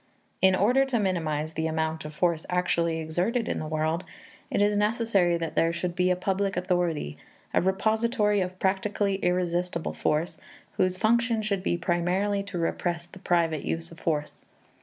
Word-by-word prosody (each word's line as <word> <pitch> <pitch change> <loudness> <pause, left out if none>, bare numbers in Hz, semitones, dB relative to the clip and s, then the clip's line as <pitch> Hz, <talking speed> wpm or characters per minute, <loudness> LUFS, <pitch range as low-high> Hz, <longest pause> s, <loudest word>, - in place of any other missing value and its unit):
In 190 0 +5
order 245 +8 +4
to 265 -3 0
minimize 160 -5 -1
the 160 0 -1
amount 160 0 -2
of 150 - -7
force 170 -1 +1
actually 170 -2 +1
exerted 180 +10 -1
in - - -1
the 155 - -4
world, 160 +3 -1 0.5
it - - 0
is 205 0 +3
necessary 210 -4 +2
that 165 -1 -4
there 165 - +3
should 170 +1 -3
be 180 0 +2
a 180 - +3
public 195 +1 -1
authority, 175 - -1 0.3
a - - +4
repository 210 +2 +1
of 185 0 -3
practically 195 +1 0
irresistible 180 -2 -1
force, 155 +3 -1 0.4
whose 185 0 +2
function 230 +1 +2
should 200 -3 -1
be 175 - 0
primarily 180 +4 0
to 200 -2 -6
repress 170 0 -1
the 180 +2 -14
private 170 -5 +1
use 165 +1 -3
of 165 - -13
force. 150 -2 -2
180 Hz, 165 wpm, -27 LUFS, 165-200 Hz, 0.5 s, In